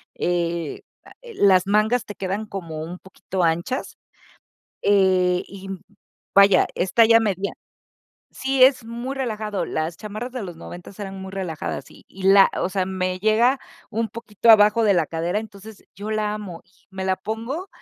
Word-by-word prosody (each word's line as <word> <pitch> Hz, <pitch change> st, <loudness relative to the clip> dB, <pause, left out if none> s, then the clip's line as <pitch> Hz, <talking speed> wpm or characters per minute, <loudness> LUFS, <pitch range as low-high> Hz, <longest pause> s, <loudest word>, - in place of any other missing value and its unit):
eh, 170 Hz, -3 st, -2 dB, 0.5 s
las 190 Hz, -2 st, +4 dB
mangas 215 Hz, +4 st, +2 dB
te 205 Hz, -, -8 dB
quedan 195 Hz, +3 st, -3 dB
como 165 Hz, -6 st, -6 dB
un 175 Hz, +2 st, -7 dB
poquito 190 Hz, -1 st, -4 dB
anchas, 170 Hz, +10 st, -1 dB, 0.9 s
eh, 185 Hz, -3 st, +3 dB
y 195 Hz, -1 st, -10 dB, 0.7 s
vaya, 200 Hz, 0 st, +6 dB
es 180 Hz, 0 st, -2 dB
talla 230 Hz, 0 st, +6 dB
media 200 Hz, -2 st, -1 dB, 0.8 s
sí, 265 Hz, -1 st, +3 dB
es 260 Hz, -3 st, +4 dB
muy 235 Hz, +4 st, -5 dB
relajado, 215 Hz, -6 st, -3 dB
las 160 Hz, +2 st, -3 dB
chamarras 215 Hz, +4 st, -6 dB
de 250 Hz, -, -4 dB
los 175 Hz, -4 st, -7 dB
noventas 175 Hz, +4 st, -11 dB
eran 195 Hz, -1 st, -6 dB
muy 190 Hz, -, -7 dB
relajadas 180 Hz, -5 st, -5 dB
y -, -, -17 dB
y 190 Hz, -, -12 dB
la 195 Hz, 0 st, +7 dB
o -, -, 0 dB
sea, 190 Hz, -1 st, -1 dB
me 185 Hz, -1 st, -2 dB
llega 230 Hz, +5 st, +3 dB, 0.3 s
un 225 Hz, +1 st, -1 dB
poquito 230 Hz, 0 st, -3 dB
abajo 215 Hz, +1 st, +6 dB
de 200 Hz, -2 st, +4 dB
la 170 Hz, -3 st, +2 dB
cadera 165 Hz, +5 st, -2 dB
entonces 215 Hz, -1 st, -11 dB
yo 210 Hz, +2 st, -6 dB
la 215 Hz, -1 st, 0 dB
amo 195 Hz, -6 st, -7 dB
y 185 Hz, -2 st, -31 dB
me 190 Hz, -1 st, -5 dB
la 190 Hz, 0 st, +1 dB
pongo 235 Hz, -, -5 dB
200 Hz, 160 wpm, -23 LUFS, 185-220 Hz, 0.9 s, la